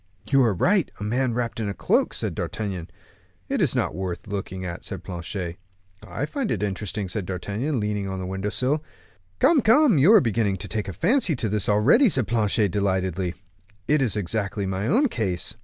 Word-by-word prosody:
"You 135 -1 +5
are 115 -4 +3
right; 180 - +2
a - - -5
man 120 +3 0
wrapped 120 -1 -2
in 105 -2 -1
a 100 - -4
cloak," - - +1
said - - -2
D'Artagnan. 95 -6 -4 0.6
"It's - - +1
not - - 0
worth 95 -2 -4
looking 95 -2 -4
at," 85 0 -6
said 95 -3 -6
Planchet. 90 -1 -5 0.5
"I 145 - -3
find 265 - -3
it 105 - -1
interesting," 100 0 -3
said 90 0 -4
D'Artagnan, 105 - -2
leaning 105 -2 -2
on 95 - -4
the 95 - -4
window 95 +2 -3
sill. 135 +8 0 0.5
"Come, 290 - +4
come, 235 - +5
you 160 +10 +6
are 220 - +9
beginning 110 - 0
to 100 - -7
take 105 0 -3
a 95 - -4
fancy 225 - +2
to 115 - -2
the 105 - -3
place 105 - 0
already," 110 - +5
said 130 - +1
Planchet, 110 -3 +1
delightedly; 95 -2 -1 0.5
"it 150 -1 +3
is 110 -6 +1
exactly 100 +1 -2
my 95 +2 -2
own 275 +7 +3
case. 95 - -2
105 Hz, 195 wpm, -24 LUFS, 95-130 Hz, 0.6 s, are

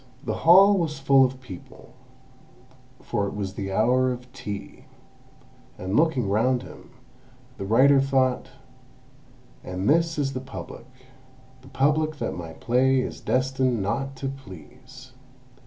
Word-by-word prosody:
The 110 - -2 0.2
hall 195 +3 +7
was 155 -3 -2
full 135 0 +5
of 130 0 -1
people, 95 -9 -12 1.1
for 105 -4 -1
it - - -6
was 100 -2 -4
the 95 -1 -5
hour 125 +5 +2
of 125 0 -8
tea; 105 -6 -8 0.9
and 95 +3 -4
looking 150 -8 +2
round 120 +5 +1
him, - - -13 0.7
the 95 - -4
writer 135 +5 +5
thought 130 -2 0 1.1
"And 90 +2 -4
this 165 +1 +2
is 135 -2 -1
the 130 - -3
Public—the 130 0 -14
Public 155 +4 +1
that - - -3
my 85 -2 -7
play 130 +5 +2
is 125 - -4
destined 130 -3 0
not 135 +7 -3
to 135 +1 -5
please!" 120 - -13
130 Hz, 130 wpm, -25 LUFS, 110-135 Hz, 1.1 s, hall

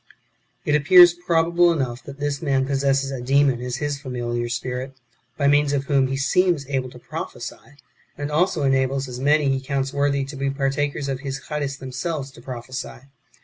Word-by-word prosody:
3. 150 - 0
It - - +6
appears 175 +3 +8
probable 170 0 +2
enough 130 -6 -2
that 140 0 -10
this 145 -1 -2
man 135 -4 +1
possesses 135 0 +1
a 130 -2 -4
demon 135 -1 +2
as 125 -1 -3
his 145 +1 -2
familiar 120 -3 -3
spirit, 125 +2 -4 0.4
by 140 - +2
means 145 0 +3
of 140 -1 0
whom 135 -1 +2
he 135 +1 -2
seems 165 +2 +2
able 130 -2 -1
to - - -13
prophesy, 145 - -8 0.4
and 145 0 -4
also 160 0 +1
enables 135 0 +1
as 125 -1 -7
many 145 +2 +3
as 135 - +3
he 135 0 -1
counts 135 0 -2
worthy 140 -1 +1
to 140 +2 -8
be 135 0 -1
partakers 140 +1 -1
of 135 -1 -2
his 135 -1 -4
Charis 145 -2 -3
themselves 135 +2 -4
to - - -15
prophesy. 130 0 -7
140 Hz, 190 wpm, -23 LUFS, 130-145 Hz, 0.4 s, appears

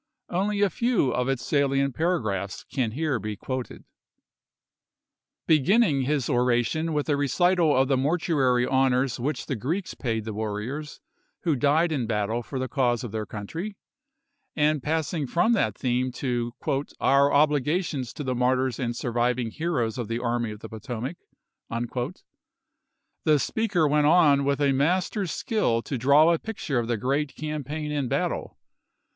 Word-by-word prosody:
Only 200 +3 0
a 200 -2 +3
few 235 - +1
of 125 +2 -1
its 130 -4 -1
salient 140 -1 +1
paragraphs 110 - -1
can 120 -6 0
here 150 -3 -1
be 105 -1 -4
quoted. 130 +4 -5 1.6
Beginning 160 - +3
his 140 -3 0
oration 125 +6 +1
with 150 -1 -1
a 145 - +2
recital 160 +2 +2
of 135 0 +3
the 135 -1 +2
mor 145 +7 +1
tuary 130 -7 +2
honors 130 -1 +1
which 145 +6 -2
the 135 - -2
Greeks 160 - -3
paid 110 -4 -3
the 110 - -4
warriors 110 +8 -4 0.4
who 165 -4 +1
died 150 +5 +2
in 130 -7 -1
battle 110 +1 -1
for 130 +3 -6
the 130 0 -2
cause 125 -4 0
of 120 - -5
their 110 -1 -4
country, 165 - -6 0.8
and 150 -1 +2
passing 155 0 -1
from 175 - +2
that 110 - +1
theme 125 0 0
to 120 -2 -2 0.3
" 140 - -8
our 140 +1 +4
obligations 145 -2 +1
to 150 - -6
the 130 -2 -1
martyrs 125 0 +1
and 120 -2 -2
surviving 120 0 0
heroes 130 -8 -1
of 120 - -3
the 115 +1 -2
Army 120 -1 -1
of 105 0 -8
the - - -7
Potomac," 120 +7 -5 2.1
the 155 -2 +4
speaker 195 0 +1
went 150 0 +3
on 150 -4 +5
with 140 0 +1
a 140 -1 +4
mas 160 +8 +1
ter's 200 -5 -2
skill 120 - 0
to 140 - -4
draw 140 +7 +5
a 165 - 0
picture 170 - -3
of 115 - -2
the 120 -1 0
great 140 +6 -1
cam 155 -1 -4
paign 150 +2 -4
and 145 -4 -1
battle. - - -2
140 Hz, 165 wpm, -26 LUFS, 120-155 Hz, 2.1 s, on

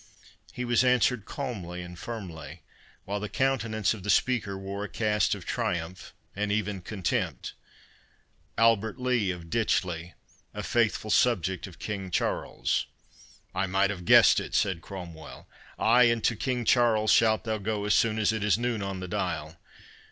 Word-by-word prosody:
He 125 - -4
was 120 +1 +3
answered 125 -3 +2
calmly 95 - -5
and 90 0 -9
firmly, 85 -7 -8 0.4
while 100 +1 -3
the 105 0 -5
countenance 115 -6 0
of 110 - -9
the 105 - -6
speaker 105 -5 +1
wore 100 +1 -5
a 105 - -5
cast 105 -2 +1
of - - -10
triumph, 85 +1 -3 0.2
and 105 +1 -1
even 105 -2 -1
contempt. 95 -1 -3 1.0
"Albert 115 0 +3
Lee 125 -6 +1
of 85 -2 -6
Ditchley, 90 -7 -1 0.4
a - - -4
faithful 110 -2 0
subject 95 -7 +2
of 90 -4 -13
King 95 -1 -5
Charles." 85 - -1 0.7
"I 95 +1 0
might 95 +2 +2
have 90 -3 -6
guessed - - +7
it," - - -5
said 95 -4 +1
Cromwell.—"Ay, 95 +7 -1
and 115 -1 +2
to 115 - +2
King 125 +1 -2
Charles 110 -3 +3
shalt 110 -1 +4
thou 110 -1 -2
go 105 0 -2
as 105 - +2
soon 110 -1 +2
as 110 -1 +2
it 110 -2 -2
is 105 -2 +3
noon 120 -2 -1
on 100 -1 -4
the 90 - -5
dial. 85 -3 -3
105 Hz, 160 wpm, -28 LUFS, 95-115 Hz, 1.0 s, guessed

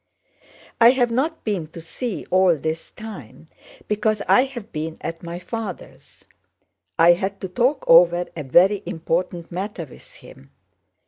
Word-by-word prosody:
"I 230 0 +8
have 245 -2 +2
not 300 +7 -1
been 195 -8 -2
to - - -8
see 200 +7 -5
you - - -14
all 185 -2 +4
this 160 +2 -4
time 160 - -11 0.4
because 210 0 0
I 250 - +5
have 240 -5 -9
been 160 +1 -5
at 165 0 -6
my 170 0 -6
father's. 205 0 -8 0.7
I 170 +1 +7
had 195 +3 -3
to 190 - -3
talk 245 +10 0
over 175 +1 +6
a 160 - -4
very 185 +9 +4
important 170 +1 -3
matter 185 -1 -5
with 135 - -17
him. 70 - -16
180 Hz, 150 wpm, -22 LUFS, 165-220 Hz, 0.7 s, I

